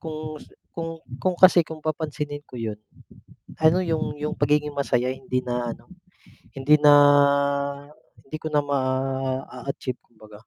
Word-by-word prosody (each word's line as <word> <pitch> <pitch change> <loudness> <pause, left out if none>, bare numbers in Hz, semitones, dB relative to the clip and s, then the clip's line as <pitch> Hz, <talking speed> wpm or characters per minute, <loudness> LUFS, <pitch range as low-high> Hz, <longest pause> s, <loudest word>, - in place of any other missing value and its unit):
Kung 155 -1 -7
s - - -15 0.2
kung 165 -1 -6 0.2
kung 185 -1 0
kasi 185 -1 +7
kung 155 -1 -10
papansinin 150 -2 -3
ko - - -11
'yon, 110 -3 -4 0.8
ano 165 +4 +4
'yong 160 -3 -2
'yong 150 +1 -4
pagiging 150 +1 +1
masaya 130 -3 0
hindi 130 -1 -3
na 120 -1 -2
ano, - - -22 0.6
hindi 140 +2 +4
na 150 -1 +6 1.3
hindi 155 +3 -7
ko - - -4
na 145 - +4
maa-achieve 130 -1 -3
kumbaga. 110 -2 -18
145 Hz, 140 wpm, -24 LUFS, 130-155 Hz, 1.3 s, kasi